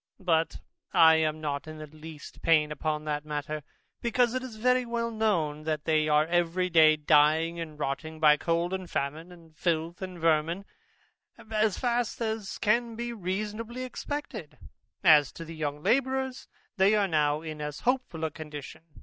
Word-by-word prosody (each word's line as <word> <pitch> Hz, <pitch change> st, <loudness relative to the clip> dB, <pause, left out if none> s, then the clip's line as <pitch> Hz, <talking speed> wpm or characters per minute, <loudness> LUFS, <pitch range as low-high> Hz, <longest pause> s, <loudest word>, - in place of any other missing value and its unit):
But 165 Hz, -2 st, +1 dB, 0.3 s
I 160 Hz, 0 st, +7 dB
am 155 Hz, -1 st, 0 dB
not 145 Hz, -1 st, -3 dB
in 155 Hz, 0 st, -8 dB
the 155 Hz, -, -7 dB
least 155 Hz, 0 st, -11 dB
pain 155 Hz, -2 st, +3 dB
upon 150 Hz, 0 st, -2 dB
that 150 Hz, -1 st, -2 dB
matter, 150 Hz, 0 st, -4 dB, 0.4 s
because 240 Hz, 0 st, +2 dB
it 255 Hz, -, -1 dB
is 255 Hz, -3 st, -8 dB
very 250 Hz, +3 st, +2 dB
well 235 Hz, -1 st, -2 dB
known, 175 Hz, -10 st, 0 dB
that 155 Hz, -2 st, -2 dB
they 155 Hz, -1 st, +2 dB
are 150 Hz, 0 st, +4 dB
every 175 Hz, +2 st, 0 dB
day 155 Hz, -2 st, +7 dB
dying, 155 Hz, +2 st, +3 dB
and 155 Hz, -2 st, -6 dB
rotting, 155 Hz, +2 st, -4 dB
by 150 Hz, -1 st, +6 dB
cold 170 Hz, +3 st, -1 dB
and 185 Hz, -2 st, -4 dB
famine, 155 Hz, +5 st, -3 dB
and 165 Hz, -3 st, -16 dB
filth, 170 Hz, +1 st, -1 dB
and 185 Hz, -1 st, -6 dB
vermin, 165 Hz, +3 st, +1 dB, 0.9 s
as 215 Hz, -2 st, +1 dB
fast 240 Hz, -2 st, -1 dB
as 220 Hz, -3 st, -3 dB
can 230 Hz, +2 st, +1 dB
be 235 Hz, +1 st, -4 dB
reasonably 215 Hz, +5 st, -4 dB
expected. 255 Hz, -, -6 dB, 0.5 s
And 170 Hz, -, +8 dB
as 150 Hz, -3 st, +5 dB
to 165 Hz, -, -8 dB
the 165 Hz, -, -8 dB
young 150 Hz, -1 st, -4 dB
labourers, 265 Hz, 0 st, 0 dB, 0.3 s
they 195 Hz, +3 st, +5 dB
are 205 Hz, -2 st, +2 dB
now 150 Hz, -2 st, +1 dB
in 155 Hz, -2 st, -6 dB
almost 150 Hz, -1 st, -5 dB
as -, -, -19 dB
hopeful 250 Hz, -10 st, 0 dB
a 160 Hz, -, -1 dB
condition. 150 Hz, -3 st, -9 dB
165 Hz, 175 wpm, -28 LUFS, 155-215 Hz, 0.9 s, And